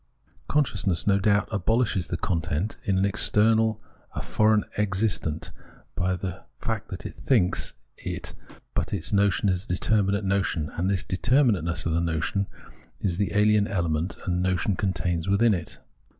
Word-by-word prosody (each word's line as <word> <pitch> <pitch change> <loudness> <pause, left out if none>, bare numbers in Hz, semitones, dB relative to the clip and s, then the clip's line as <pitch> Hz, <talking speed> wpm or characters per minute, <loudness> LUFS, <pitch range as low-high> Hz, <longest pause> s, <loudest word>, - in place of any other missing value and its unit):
Consciousness, 125 - +1
no 100 -1 +3
doubt, 100 0 +2
abohshes 110 -2 +1
the - - -2
content 85 +3 -1
as 100 - +2
an 95 +1 +2
external, 110 +2 +3 0.4
a - - -2
foreign 110 0 +3
existent, 95 -6 0 0.4
by 90 +1 0
the 95 0 -5 0.2
fact 110 -1 -3
that 90 - -7
it - - -6
thinks 110 -11 +1 0.2
it, - - -6 0.4
but - - 0
the 80 - -3
notion 100 0 +3
is 95 +1 0
a - - -22
determinate 100 +2 +1
notion, 95 -6 0
and 90 +3 -1
this 95 -2 +1
determinateness 100 - +1
of 85 - 0
the 85 - +2
notion 85 +4 -1 0.5
is 90 -4 -1
the 100 - +2
ahen 105 +1 +3
element 85 -2 -1
the 95 - -1
notion 90 +1 +1
contains 90 -3 -1
within 110 +3 +4
it. 85 -3 -5
95 Hz, 150 wpm, -26 LUFS, 90-105 Hz, 0.5 s, within